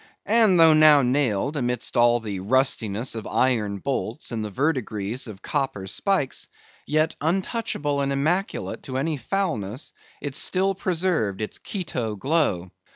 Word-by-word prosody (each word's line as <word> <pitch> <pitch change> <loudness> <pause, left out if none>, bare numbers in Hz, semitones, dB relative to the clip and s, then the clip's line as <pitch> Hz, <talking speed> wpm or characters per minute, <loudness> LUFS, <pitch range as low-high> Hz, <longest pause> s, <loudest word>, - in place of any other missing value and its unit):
And 215 -5 +4
though 165 -1 +8
now 155 -2 +7
nailed 125 0 +1
amidst 125 -3 -2
all 120 0 +4
the 105 -4 -5
rustiness 115 0 0
of 110 -1 -5
iron 110 -6 +1
bolts 130 +4 -3
and 115 -2 -2
the 105 - -4
verdigris 125 -3 -2
of 100 -4 -10
copper 115 -8 -2
spikes, 145 - -1 0.4
yet, 155 +2 +1
untouchable 160 -4 -1
and 140 0 0
immaculate 160 +8 -1
to 130 -2 -5
any 150 +3 -1
foulness, 125 - -3 0.3
it 145 -2 -5
still 195 +5 +1
preserved 175 - -1
its 110 - -5
Quito 150 - -4
glow. 105 - 0
135 Hz, 140 wpm, -24 LUFS, 110-160 Hz, 0.4 s, though